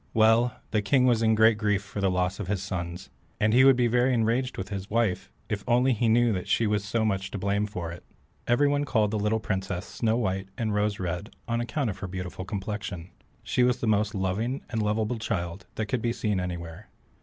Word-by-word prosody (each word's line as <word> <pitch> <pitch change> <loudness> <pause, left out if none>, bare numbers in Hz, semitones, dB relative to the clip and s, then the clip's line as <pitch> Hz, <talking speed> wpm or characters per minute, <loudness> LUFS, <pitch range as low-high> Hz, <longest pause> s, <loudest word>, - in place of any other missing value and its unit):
Well, 115 +2 +4 0.2
the 105 -1 +2
king 125 +5 +3
was 120 -3 +3
in 110 -1 +4
great 110 0 +5
grief 105 -2 +1
for 100 +1 -6
the 95 - +3
loss 90 +1 0
of 105 - -4
his 100 -1 -1
sons, 85 -7 -5 0.3
and 110 +1 +3
he 130 +2 +6
would 135 -1 +7
be 125 -1 +2
very 125 +2 +3
enraged 120 +3 0
with 95 0 -5
his 100 -1 -5
wife 110 -5 0 0.2
if 105 - -2
he - - -19
only 125 +2 +4
knew 115 +1 +3
that 90 -2 -3
she 115 - +2
was 105 -1 +1
so 110 +2 0
much 95 -2 -1
to - - -5
blame 100 +2 0
for 90 -5 -5
it. 85 - -10 0.4
Everyone 145 +4 +3
called 110 -7 +1
the 110 - -1
little 105 +2 +1
princess 95 -3 -3
Snow 115 -1 0
white 95 -4 -1
and 110 -4 -1
Rose 105 0 0
red 90 +4 -4
on 115 0 0
account 120 0 -1
of 95 - -10
her 95 - -4
beautiful 90 0 -6
complexion. 100 -3 -5 0.3
She - - 0
was 125 0 +3
the - - -2
most 105 -1 +1
loving 105 +8 -1
and 110 -2 -1
lovable 110 +2 0
child 90 -4 -3
that 110 - -1
could 120 +2 -2
be 115 0 0
seen 105 -5 -1
anywhere. 90 +1 -6
105 Hz, 225 wpm, -27 LUFS, 95-115 Hz, 0.4 s, would